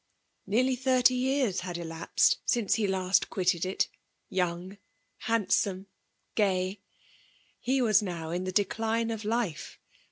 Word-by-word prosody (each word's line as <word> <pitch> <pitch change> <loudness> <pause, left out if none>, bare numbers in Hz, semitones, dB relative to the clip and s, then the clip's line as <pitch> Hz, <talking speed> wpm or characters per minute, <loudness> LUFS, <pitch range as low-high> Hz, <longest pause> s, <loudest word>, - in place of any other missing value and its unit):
Neariy 255 +5 +2
thirty 255 -1 +4
years 255 -5 +1
had 180 -1 -5
dapsed 165 -1 +1
nnce 235 -5 +2
he 215 -3 +1
last 190 0 +1
quitted 185 -2 0
it— 190 - 0 0.4
young, 185 +1 -2 0.5
hand«(Nsie« 200 -3 +1 0.5
gi^y. 190 -2 +1 0.8
He 260 +1 +1
was 215 -2 +4
now 170 -5 -4
in 175 +2 -2
the 185 - -2
decline 225 +4 0
of 220 -1 -4
life. 215 -7 -2
200 Hz, 125 wpm, -29 LUFS, 185-230 Hz, 0.8 s, thirty